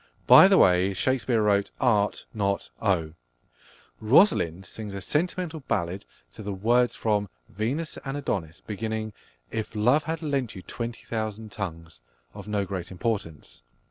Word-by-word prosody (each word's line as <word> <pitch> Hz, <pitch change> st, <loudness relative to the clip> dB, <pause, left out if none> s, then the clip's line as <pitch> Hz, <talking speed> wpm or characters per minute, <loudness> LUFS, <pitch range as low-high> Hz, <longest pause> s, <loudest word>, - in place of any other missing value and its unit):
(By 190 Hz, -, +9 dB
the 195 Hz, -1 st, +5 dB
way, 90 Hz, -, +4 dB
Shakespeare 120 Hz, 0 st, +1 dB
wrote 100 Hz, -1 st, +2 dB
"Art," 105 Hz, -5 st, +1 dB
not 100 Hz, -, -1 dB
"Oh.") 85 Hz, -6 st, 0 dB, 0.9 s
Rosalind 105 Hz, -, +3 dB
sings 105 Hz, +2 st, -7 dB
a -, -, -4 dB
sentimental 165 Hz, -, -1 dB
ballad 90 Hz, 0 st, -2 dB, 0.3 s
to -, -, -10 dB
the 100 Hz, -1 st, -4 dB
words 120 Hz, +5 st, +2 dB
from 105 Hz, -3 st, 0 dB, 0.2 s
Venus 125 Hz, -, -3 dB
and 135 Hz, +1 st, -4 dB
Adonis 80 Hz, -, -3 dB
beginning 110 Hz, 0 st, -4 dB, 0.4 s
"If 110 Hz, 0 st, -4 dB
love 125 Hz, +8 st, +3 dB
had 160 Hz, +1 st, -3 dB
lent 140 Hz, -7 st, -1 dB
you 95 Hz, -, -9 dB
twenty 115 Hz, +3 st, -6 dB
thousand 110 Hz, -1 st, -4 dB
tongues," 80 Hz, -, -6 dB, 0.3 s
of 100 Hz, -, -10 dB
no 105 Hz, -2 st, -1 dB
great 95 Hz, -3 st, -5 dB
importance. 95 Hz, -5 st, -4 dB
105 Hz, 140 wpm, -26 LUFS, 95-120 Hz, 0.9 s, By